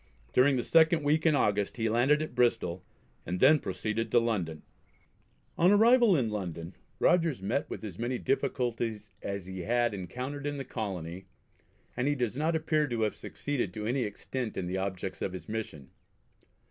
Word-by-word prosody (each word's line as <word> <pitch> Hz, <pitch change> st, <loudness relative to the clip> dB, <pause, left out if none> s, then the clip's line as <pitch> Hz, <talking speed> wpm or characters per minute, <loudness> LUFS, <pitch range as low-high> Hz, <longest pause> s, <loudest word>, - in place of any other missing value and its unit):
During 135 Hz, +2 st, +5 dB
the 120 Hz, -, 0 dB
second 160 Hz, -1 st, +4 dB
week 155 Hz, +3 st, +2 dB
in 155 Hz, -, +4 dB
August 105 Hz, -5 st, +1 dB
he 115 Hz, -1 st, 0 dB
landed 130 Hz, +7 st, +3 dB
at 155 Hz, -, -7 dB
Bristol, 115 Hz, -8 st, +1 dB, 0.4 s
and 90 Hz, 0 st, -3 dB
then 150 Hz, +3 st, +6 dB
proceeded 110 Hz, +4 st, -3 dB
to 120 Hz, -, +5 dB
London. 95 Hz, -10 st, -2 dB, 1.0 s
On 175 Hz, -, +6 dB
arrival 225 Hz, -2 st, +6 dB
in 115 Hz, -5 st, 0 dB
London 90 Hz, -4 st, -5 dB, 0.2 s
Rogers 165 Hz, -6 st, +3 dB
met 120 Hz, +8 st, -1 dB
with -, -, -6 dB
as 100 Hz, -4 st, -7 dB
many 120 Hz, +2 st, -1 dB
difficulties 120 Hz, -6 st, -1 dB
as 100 Hz, -2 st, -4 dB
he 95 Hz, 0 st, -7 dB
had 120 Hz, +5 st, +1 dB
encountered 125 Hz, +10 st, -5 dB
in 145 Hz, 0 st, -3 dB
the 135 Hz, -, -5 dB
Colony, 95 Hz, -6 st, -5 dB, 0.7 s
and 125 Hz, +2 st, 0 dB
he 145 Hz, -, +2 dB
does 120 Hz, -4 st, -1 dB
not 155 Hz, +4 st, 0 dB
appear 155 Hz, -1 st, +1 dB
to 120 Hz, -3 st, -2 dB
have 105 Hz, -, +1 dB
succeeded 130 Hz, -11 st, -4 dB
to 105 Hz, -, -4 dB
any 125 Hz, +4 st, 0 dB
extent 120 Hz, +2 st, -4 dB
in 95 Hz, -, -2 dB
the 90 Hz, +1 st, -3 dB
objects 95 Hz, -1 st, -4 dB
of 95 Hz, -, -2 dB
his 95 Hz, -, -8 dB
mission. 105 Hz, -11 st, -5 dB
120 Hz, 175 wpm, -30 LUFS, 100-145 Hz, 1.0 s, then